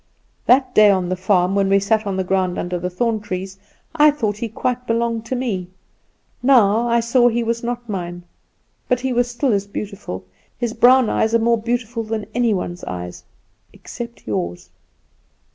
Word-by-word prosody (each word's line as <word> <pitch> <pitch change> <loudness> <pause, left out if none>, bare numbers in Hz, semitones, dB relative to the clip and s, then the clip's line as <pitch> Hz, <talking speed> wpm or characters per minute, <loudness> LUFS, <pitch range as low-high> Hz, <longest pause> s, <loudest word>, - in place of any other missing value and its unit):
That 255 0 +4
day 210 -1 +7
on 185 -3 +1
the 185 - 0
farm, 185 0 +1
when 195 -1 +2
we 195 0 +4
sat 215 +2 0
on 195 -1 -2
the 190 - 0
ground 185 -1 0
under 180 0 -3
the 180 +1 -3
thorn 220 +4 -1
trees, 190 -1 -6 0.3
I 300 -1 +6
thought 220 -9 -1
he 230 +1 -4
quite 250 +3 -3
belonged 230 0 -1
to 260 - -2
me; 215 -8 -2 0.7
now, 240 -3 +4
I 235 0 +3
saw 240 +1 +3
he 235 0 +1
was 230 0 -1
not 240 0 -4
mine. 175 -4 -5 0.7
But 250 0 +1
he 260 -1 -1
was 245 0 +1
still 245 +1 0
as 200 0 -1
beautiful. 200 - -6 0.3
His 235 -2 -2
brown 250 +1 +5
eyes 220 +2 +1
are - - +7
more 230 0 +1
beautiful 235 0 -2
than 220 -1 -4
any 240 -1 +2
one's 180 -2 -3
eyes, 90 -1 -7 0.5
except 235 -1 -9
yours. 90 -4 -4
220 Hz, 180 wpm, -20 LUFS, 190-240 Hz, 0.7 s, day